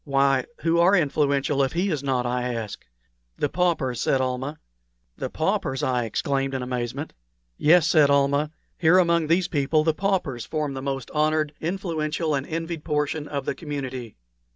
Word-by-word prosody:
"Why, 135 -2 +2 0.2
who 165 0 +2
are 180 +4 +5
influential 140 -3 +1
if 135 -1 0
he 180 +3 0
is 150 -4 -1
not?" 130 -3 0
I 125 0 -1
asked. 110 -3 -6 0.5
"The 145 - 0
paupers," 165 -9 0
said 135 - +2
Almah. 130 +3 -2 0.6
"The - - -4
paupers!" 130 - -1
I 125 -2 +1
exclaimed, 135 +4 -1
in 130 - -2
amazement. 125 +3 -4 0.4
"Yes," 160 - +5
said 155 -4 +5
Almah. 140 +1 +2 0.3
"Here 170 +2 +5
among 170 -3 +3
these 175 +2 +2
people 155 -1 +1
the 160 0 +2
paupers 175 - -1
form 150 -1 -2
the 135 - -5
most 135 -2 -4
honored, 155 0 +1
influential, 165 -3 -2
and 140 0 -1
envied 165 -1 -4
portion 150 0 -1
of 140 -2 -4
the - - -1
community." 130 -6 -6
145 Hz, 165 wpm, -24 LUFS, 135-160 Hz, 0.6 s, are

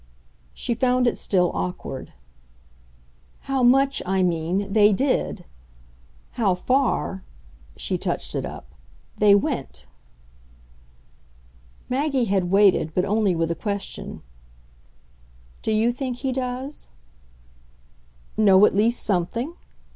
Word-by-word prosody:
She 240 - -2
found 250 +1 +2
it 240 - +2
still 180 -3 +1
awkward. 90 0 -5 1.3
"How 270 -1 -1
much, 270 +3 +4
I 190 0 +1
mean, 180 +3 -1
they 210 -1 +5
did. 235 -6 -1 0.9
How 210 -7 +1
far" 250 -3 0 0.6
she - - -3
touched - - -3
it - - -2
up - - -9 0.5
"they 205 -1 +6
went." 200 - -2 2.0
Maggie 270 -1 0
had 190 -4 0
waited, 195 -5 +3
but 180 - +2
only 205 -2 +1
with 165 0 0
a - - -1
question. 200 +3 -5 1.4
"Do - - -2
you 220 +2 +2
think 250 0 -4
he 265 +1 -2
does?" 255 +2 -4 1.5
"Know 200 -2 +6
at - - +2
least 230 +4 +2
something? 220 - -1
210 Hz, 110 wpm, -23 LUFS, 185-250 Hz, 2.0 s, they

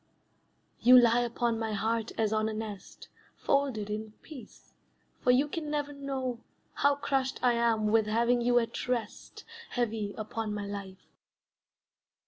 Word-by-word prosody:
You 255 +1 +8
lie 235 0 +4
upon 235 -1 -1
my 220 -1 -2
heart 225 +2 -1
as 220 -1 +1
on 215 0 +1
a - - -4
nest, 210 -3 -8 0.3
Folded 270 -7 0
in 215 +1 -5
peace, 295 -6 -13 0.5
for - - -1
you 260 +4 +4
can 305 0 -5
never 290 -1 -2
know 265 -3 -4 0.3
How 285 0 +3
crushed 270 -2 -1
I 245 -1 +4
am 230 -2 +1
with 215 0 +3
having 235 +3 +2
you 245 +1 +3
at 235 +1 -1
rest 235 -4 -4 0.2
Heavy 220 -4 -2
upon 215 0 -4
my 205 -1 -4
life. 200 -2 -8
230 Hz, 145 wpm, -30 LUFS, 215-255 Hz, 0.5 s, You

